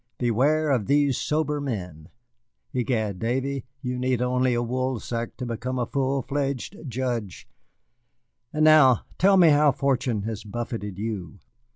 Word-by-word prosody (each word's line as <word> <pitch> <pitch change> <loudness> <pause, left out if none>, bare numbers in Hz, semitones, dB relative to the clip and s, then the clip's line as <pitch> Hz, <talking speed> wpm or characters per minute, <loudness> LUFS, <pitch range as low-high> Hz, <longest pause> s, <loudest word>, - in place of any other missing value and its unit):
Beware 140 +6 +2
of 120 -7 +1
these 140 -2 +3
sober 150 +1 -1
men. 90 - -5 0.6
Egad, 115 -6 -1
Davy, 130 +3 -2 0.2
you 125 -1 -3
need 125 -1 0
only 125 0 +1
a 120 - 0
woolsack 120 -1 -3
to 125 - -4
become 120 +2 -3
a 120 - 0
full 135 +1 -1
fledged 140 -2 -3
judge. 120 -6 -3 1.0
And 155 0 +2
now 150 -6 +6
tell 195 +1 +5
me 175 -3 +7
how 150 0 +5
fortune 130 -6 0
has 110 -1 -4
buffeted 105 -2 -5
you." 105 -2 -5
125 Hz, 140 wpm, -25 LUFS, 115-140 Hz, 1.0 s, me